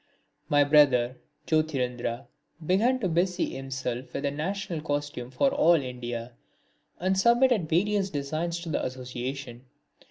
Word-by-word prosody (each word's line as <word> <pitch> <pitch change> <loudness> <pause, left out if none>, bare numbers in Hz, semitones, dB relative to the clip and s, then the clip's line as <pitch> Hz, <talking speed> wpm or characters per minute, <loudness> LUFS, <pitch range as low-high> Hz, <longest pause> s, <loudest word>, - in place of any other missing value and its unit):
My 145 0 +5
brother 135 -4 +4 0.3
Jyotirindra 125 -7 -1 0.4
began 220 +10 +3
to 190 - +1
busy 175 +2 0
himself 130 -2 -4
with 140 - -2
a 140 - +1
national 170 +2 -3
costume 145 -5 -3
for 270 - +2
all 225 -12 +5
India, 125 -4 -4 0.7
and 185 +2 +1
submitted 235 -3 +3
various 200 +3 +1
designs 155 +3 -2
to 170 - -6
the 155 - -1
association. 125 0 -5
145 Hz, 125 wpm, -27 LUFS, 130-180 Hz, 0.7 s, My